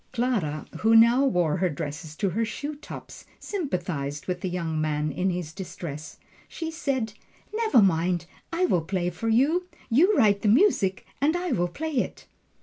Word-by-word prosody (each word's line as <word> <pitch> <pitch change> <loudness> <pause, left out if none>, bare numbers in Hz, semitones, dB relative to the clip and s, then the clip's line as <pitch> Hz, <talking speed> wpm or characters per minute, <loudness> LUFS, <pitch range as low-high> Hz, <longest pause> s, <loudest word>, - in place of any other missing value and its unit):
Clara, 225 -12 -1
who 225 +1 +4
now 235 +4 +7
wore 180 - +2
her 185 0 +1
dress 150 +1 -6
to 195 +3 0
her 225 +6 0
shoe 285 +7 -4
tops, 295 +1 -10 0.2
sympathized 175 - -3
with 180 -1 -3
the 190 - -2
young 165 -3 -2
man 150 0 0
in 185 +4 0
his 175 -3 -3
distress. 170 -5 -7 0.3
She 325 -1 -5
said, 270 -9 -2 0.4
"Never 435 - +4
mind, 175 -1 +1 0.3
I 345 +2 +2
will 180 - +2
play 175 +1 -1
for 225 +6 -3
you 300 +11 +3 0.2
you 360 - +5
write 205 -2 +4
the - - 0
music 210 - +3 0.2
and 305 +4 +3
I 360 0 -2
will 175 0 +1
play 305 - -4
it!" - - -2
195 Hz, 170 wpm, -26 LUFS, 170-275 Hz, 0.4 s, now